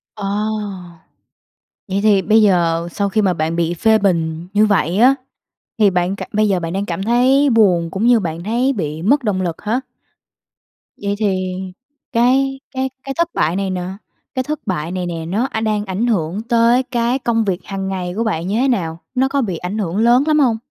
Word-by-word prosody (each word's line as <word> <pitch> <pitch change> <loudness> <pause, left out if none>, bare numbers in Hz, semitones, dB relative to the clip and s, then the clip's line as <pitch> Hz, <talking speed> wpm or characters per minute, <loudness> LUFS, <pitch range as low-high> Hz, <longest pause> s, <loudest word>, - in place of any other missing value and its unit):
Ờ. 210 -2 -5 1.6
Vậy 190 0 -1
thì 205 -3 +4
bây 215 +5 +4
giờ 170 -4 +2
sau 200 +3 -1
khi 215 +2 +1
mà 190 -3 +2
bạn 160 0 -2
bị 170 0 0
phê 220 +5 +3
bình 170 -4 -1
như 210 +1 +4
vậy 190 -4 +1
á, 255 +5 +6 0.6
thì 210 -2 +5
bạn 180 +1 0
cảm - - -7
bây 215 0 +2
giờ 190 -3 +1
bạn 165 -1 -4
đang 195 +2 -1
cảm 175 0 -3
thấy 255 +6 +3
buồn 185 -8 +3
cũng 205 +6 -1
như 240 -2 +5
bạn 165 -3 -4
thấy 240 +6 +1
bị 160 - -4
mất 270 +8 +2
động 195 -4 0
lực 170 -3 -4
hả? 225 +5 0 1.2
Vậy 200 0 -1
thì 185 -3 -1 0.6
cái 270 +3 +2
cái 265 0 -2
cái 275 - -4
thất 340 0 +1
bại 160 +3 +1
này 195 0 -1
nè, 185 -1 -2 0.5
cái 260 - 0
thất 300 +2 -3
bại 170 -3 -2
này 180 -1 -3
nè 165 -2 -4
nó, 205 +10 -1
a, 220 - -2
đang 215 -2 0
ảnh 195 +5 -1
hưởng 190 -3 -1
tới 235 +2 +4
cái 245 0 -1
công 230 -3 0
việc 185 -3 -1
hằng 195 -1 -4
ngày 185 -2 -3
của 230 - +1
bạn 175 -6 -2
như 200 - -1
thế 270 - +2
nào? 170 -10 -1 0.2
Nó 260 +1 +3
có 280 +1 0
bị 190 -8 -2
ảnh 180 +5 -4
hưởng 190 -3 -2
lớn 240 +4 +4
lắm 305 -1 +3
hông? 245 -6 +3
205 Hz, 210 wpm, -18 LUFS, 180-235 Hz, 1.6 s, á